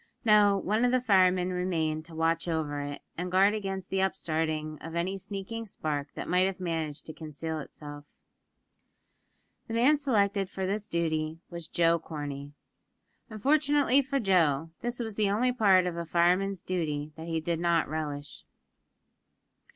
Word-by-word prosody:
No; 210 -2 +6
one 215 +4 0
of 245 - +4
the 255 - +3
firemen 185 -5 +3
remained 160 -4 -1
to 165 -1 -12
watch 165 +1 +1
over 155 -3 -1
it, 145 0 -5 0.2
and 180 0 -3
guard 195 +3 +5
against 195 -3 -4
the 190 - +1
upstarting 155 -5 -1
of 165 +1 -7
any 180 +3 -1
sneaking 200 +4 -5
spark 150 -6 -3
that - - -5
might 180 +1 +3
have 195 -1 -4
managed 165 -4 -3
to 155 - -7
conceal 160 0 -5
itself. 145 0 -9 1.6
The 225 - -4
man 260 +6 +5
selected 200 -8 +1
for 190 -1 -3
this 205 +2 -2
duty 160 -2 -1
was 170 -2 -6
Joe 170 0 +2
Corney. 145 -3 -6 0.8
Unfortunately 280 +3 +3
for 275 +1 -1
Joe, 165 - +2
this 240 +1 -2
was 220 -3 -4
the 210 -2 +2
only 235 +5 +2
part 195 -7 +4
of 180 -2 -2
a 170 - -2
fireman's 180 +3 +1
duty 155 -5 -2
that 160 +1 -8
he 165 -1 -1
did 165 +1 -2
not 170 -1 +2
relish. 145 -2 -5
180 Hz, 160 wpm, -29 LUFS, 160-200 Hz, 1.6 s, No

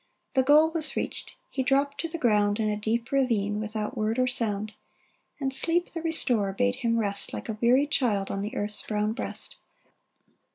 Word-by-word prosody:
The 265 - +4
goal 300 +4 +5
was 320 -2 -2
reached. - - -4 0.2
He 270 - -1
dropped 275 +2 +1
to 330 - -3
the 335 +1 -5
ground 210 -5 +2
In 215 -1 +1
a - - -1
deep 220 +3 -2
ravine, 220 -7 +1
without 215 0 -4
word 220 +2 -1
or 255 - +3
sound; 215 -4 -1 0.7
And 270 -2 -1
Sleep, 335 +6 +2
the 330 - -5
restorer, 245 -11 +2
bade 250 +3 +1
him 230 -2 0
rest 200 -3 0
Like - - -6
a 215 -2 -5
weary 250 +4 +4
child, 225 -9 0
on 195 - -3
the 210 +5 -5
earth's 210 -3 +1
brown 210 0 -1
breast. - - -4
235 Hz, 190 wpm, -27 LUFS, 210-275 Hz, 0.7 s, goal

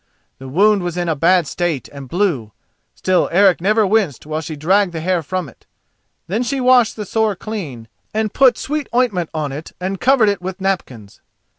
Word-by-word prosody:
The 135 - -9
wound 200 +7 +3
was 175 -1 -4
in 175 -1 -1
a 160 - 0
bad 175 +3 +3
state 160 -1 -2
and 140 -3 -10
blue, 160 - -1 0.4
still 185 -1 +1
Eric 190 0 +4
never 215 +3 +3
winced 195 - 0
while 155 +1 -3
she 155 0 -6
dragged 180 +5 +2
the 165 - -3
hair 180 +1 0
from 180 +2 -3
it. - - -18 0.6
Then 210 +7 -2
she 265 +2 -1
washed 250 -3 +4
the 210 - -5
sore 220 +1 0
clean, 165 - -6 0.2
and 215 -1 -2
put 265 -2 +4
sweet 300 0 -3
ointment 210 -10 +1
on 150 -3 -3
it 150 +4 -8
and 190 +1 -4
covered 255 -4 +4
it 200 -3 -2
with 185 +1 -6
napkins. 135 - -4
185 Hz, 190 wpm, -18 LUFS, 155-215 Hz, 0.6 s, Eric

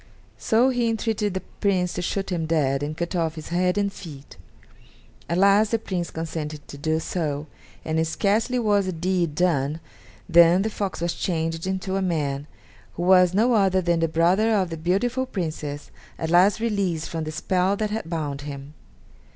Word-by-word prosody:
So 235 +4 +3
he 245 -2 +1
entreated 220 -3 -1
the 190 - -3 0.2
Prince 185 -3 +1
to 180 - -3
shoot 195 +2 -2
him 165 -3 -1
dead 140 -4 +1
and 150 +2 -4
cut 170 +2 -3
off 165 -2 0
his 155 - -8
head 180 +2 +1
and 200 -1 0
feet. 145 -8 -11 0.9
At 170 - 0
last 200 +3 +5
the 230 - +1
Prince 185 -5 -3
consented 155 -2 -5
to - - -8
do 155 +2 0
so, 155 -3 -3 0.4
and 160 +1 0
scarcely 215 +8 +1
was 205 -4 +2
the - - -1
deed 175 -2 -1
done 155 -3 +1 0.5
than 170 +2 +6
the 220 - -2
fox 200 -5 -4
was 170 0 0
changed 165 -1 -2
into 190 0 -2
a - - 0
man, 145 -6 -1 0.5
who 175 - -3
was 180 0 +5
no 235 +4 +3
other 195 -3 +3
than 170 -2 +1
the 165 - +2
brother 180 +8 +2
of 185 -4 0
the - - -3
beautiful 210 +11 0
Princess, 155 - -5 0.3
at 160 0 -3
last 185 +5 +5
released 200 -8 -1
from 165 -1 -4
the 155 - -4
spell 185 +4 0
that 215 0 -2
had 215 -6 -4
bound 150 -4 -3
him. 140 0 -8
175 Hz, 185 wpm, -24 LUFS, 160-200 Hz, 0.9 s, than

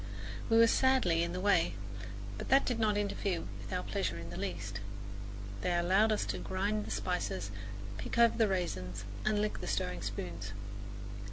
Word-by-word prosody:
We 225 - +6
were 230 - +9
sadly 230 -9 +4
in 170 0 0
the 180 - -2
way, 185 - +3 0.6
but - - -5
that 270 +1 +6
did 245 -2 0
not 210 -2 +3
interfere 200 -3 0 0.2
with - - -8
our 180 -1 0
pleasure 190 - -1
in 85 0 -6
the - - -6
least. 100 +3 -3 0.8
They 175 -1 +2
allowed 190 +6 +4
us 215 - +2
to - - -4
grind 205 +3 0
the - - -5
spices, 180 - -1 0.5
pick - - -3
over 235 -1 +6
the 225 -2 +4
raisins 100 - -2 0.2
and 215 -1 +3
lick 210 0 0
the - - -4
stirring 90 -3 -1
spoons. 95 -1 -4
185 Hz, 175 wpm, -33 LUFS, -, 0.8 s, were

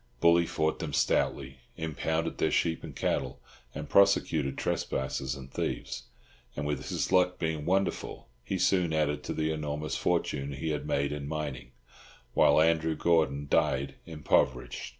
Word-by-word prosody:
Bully 85 +2 +5
fought 80 0 0
them - - -4
stoutly, 65 -1 0 0.2
impounded 80 +1 -2
their - - +2
sheep 80 -1 0
and - - -8
cattle, - - -1 0.4
and - - -5
prosecuted 90 -8 +3
trespassers 65 0 -2
and 70 -1 -10
thieves; - - -3 0.5
and, 75 - -3
his 75 -2 -2
luck 90 0 +3
being 80 -2 -2
wonderful, 95 +2 -1 0.2
he - - -2
soon 90 -4 +2
added 75 -1 +1
to - - -2
the 80 0 0
enormous 75 0 -3
fortune 70 +1 -1
he 70 +4 -3
had 75 - -3
made 70 0 0
in 75 -1 -4
mining, 70 -5 -5 0.6
while - - +5
Andrew 80 0 +3
Gordon 75 -4 +1
died 70 -3 +1
impoverished. 75 -5 0
75 Hz, 145 wpm, -29 LUFS, 70-80 Hz, 0.6 s, Bully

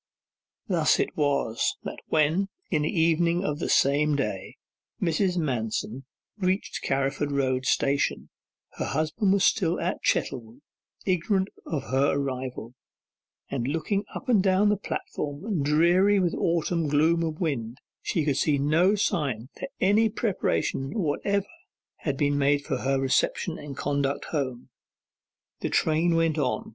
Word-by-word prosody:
Thus 170 -5 +3
it - - -1
was 140 -6 0
that - - -6
when, 160 +6 +2 0.2
in 155 -4 +2
the 150 - 0
evening 170 +1 +2
of 150 0 -2
the - - -2
same 145 +2 +3
day, 105 -9 -3 0.4
Mrs. 180 +2 +1
Manston 125 -3 -2 0.3
reached 185 +1 -1
Carriford 140 +2 -1
Road 130 -2 0
Station, 140 0 0 0.5
her - - -2
husband 155 - 0
was 195 0 +3
still 175 -4 +2
at 175 +2 -2
Chettlewood, 120 0 -1 0.4
ignorant 190 +1 +1 0.2
of 140 -6 -4
her 135 +2 +3
arrival, 130 -4 -4 0.8
and 125 -3 -2
on - - 0
looking 195 +5 -1
up - - -7
and 230 -6 +4
down 190 +2 +3
the 210 - +3
platform, 175 -1 -4
dreary 175 +7 +4
with 175 -3 +1
autumn 165 -1 0
gloom 155 +3 +3
and 160 -2 -2
wind, 125 -8 -2 0.2
she 160 -4 -1
could 140 -3 +1
see 150 -2 +2
no 160 +8 +3
sign 140 - -1
that 275 - -6
any 210 +4 +4
preparation 195 - -1
whatever 200 +3 0 0.5
had 140 -3 -3
been 145 0 +1
made 140 0 +2
for 135 -5 -1
her 135 +1 0
reception 135 +5 0
and 145 -2 -8
conduct 140 -1 -1
home. 130 -5 -3 0.9
The - - -2
train 165 +2 +2
went 165 -1 +2
on. 150 - -1
155 Hz, 145 wpm, -26 LUFS, 140-180 Hz, 0.9 s, and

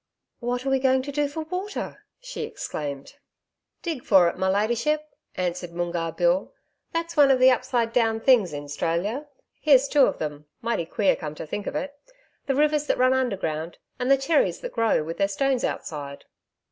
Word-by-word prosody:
'What 245 +1 -2
are 270 - 0
we 270 - +3
going 260 0 +3
to 285 - -5
do 290 +1 0
for 315 +3 -5
water?' 370 +5 -5 0.2
she - - -7
exclaimed. 140 -2 -5 0.7
'Dig 320 -8 -3
for 190 -4 +5
it, - - -7
my 190 - 0
ladyship,' 240 +10 0 0.2
answered 175 -1 -3
Moongarr 170 -1 -2
Bill. 175 +2 +1 0.4
'That's 335 +1 -3
one 290 -3 +6
of 265 - +5
the 255 +1 +6
upside 235 -2 0
down 225 -2 +2
things 225 -7 +4
in 145 0 -6
'Stralia. 180 - -2 0.3
Here's 275 -3 +5
two 285 -2 +5
of - - -2
them 150 -1 -5
mighty 230 -8 -2
queer, 200 +1 +2
come 155 -2 -6
to - - -6
think 205 +6 -5
of - - -4
it 285 0 -3 0.5
the 270 - +1
rivers 300 +1 +2
that - - +1
run 255 +1 +4
underground 175 -11 -2 0.2
and 250 +1 -1
the 275 - +6
cherries 320 - +1
that - - -6
grow 225 -8 +2
with 165 +4 -6
their 195 - +3
stones 260 +5 0
outside.' 140 -2 -4
235 Hz, 185 wpm, -25 LUFS, 175-275 Hz, 0.7 s, one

